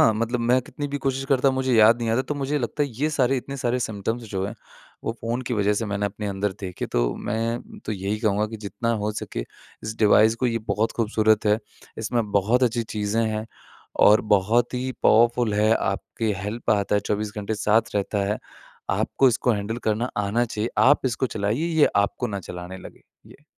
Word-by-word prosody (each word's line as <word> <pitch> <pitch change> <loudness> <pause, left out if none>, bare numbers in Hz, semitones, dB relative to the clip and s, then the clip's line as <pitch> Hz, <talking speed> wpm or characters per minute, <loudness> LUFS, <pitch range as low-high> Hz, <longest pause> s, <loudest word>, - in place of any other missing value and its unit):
हाँ 110 - +6
मतलब 115 +2 -1
मैं 125 +2 +3
कितनी 145 +3 -6
भी 145 0 -3
कोशिश 135 0 -1
करता 135 0 +3
हूँ 130 - +1
मुझे 130 -1 +1
याद 110 +2 +6
नहीं 115 -1 -2
आता 115 - +2
है - - +2
तो 150 - -3
मुझे 145 +1 -1
लगता 130 +4 -2
है 145 - 0
ये 145 +7 0
सारे 135 -2 +2
इतने 140 +2 -5
सारे 125 -1 0
सिम्पटम्स 110 +2 -3
जो 95 -1 -2
हैं 110 - -6 0.5
वो 115 - -1
फ़ोन 120 +3 -2
की 120 -1 -2
वज़ह 105 0 +2
से 115 - -1
मैंने 100 0 -1
अपने 105 +1 -5
अंदर 100 0 -1
देखे, 90 -2 -4
तो - - 0
मैं 115 - -3
तो 110 - -1
यही 100 +2 -2
कहूँगा 105 -1 +1
कि 110 +1 -7
जितना 105 +3 -3
हो 105 - 0
सके 105 - -5 0.4
इस 110 +1 -5
डिवाइस 110 +1 +5
को 125 - 0
ये 115 -1 0
बहुत 105 +3 +1
खूबसूरत 110 -1 +2
है, 105 +1 +4 0.4
इसमें 110 -1 -1
बहुत 110 +6 +2
अच्छी 120 -1 +2
चीज़ें 110 0 -1
हैं 110 0 -3 0.6
और 105 +1 +7 0.2
बहुत 115 +6 +1
ही 130 +1 -2
पावरफुल 115 -1 +4
है, 110 +1 +3
आपके 105 +3 -2
हेल्प 105 +5 -3
आता 105 -1 +2
है 105 - +3
24 105 0 -1
घंटे 105 +1 -2
साथ 110 +1 +1
रहता 100 0 -1
है। 105 - -1 0.5
आपको 135 - +2
इसको 120 +1 +1
हैंडल 105 +2 -3
करना 110 +3 0
आना 105 +4 +1
चाहिए। 110 0 -3
आप 135 0 +5
इसको 130 +1 0
चलाइए 110 +9 -1
ये - - +7
आपको 100 0 +1
न 100 -2 -4
चलाने 90 +1 -8
लगे। - - -13 0.2
ये। - - -17
110 Hz, 210 wpm, -24 LUFS, 105-120 Hz, 0.6 s, और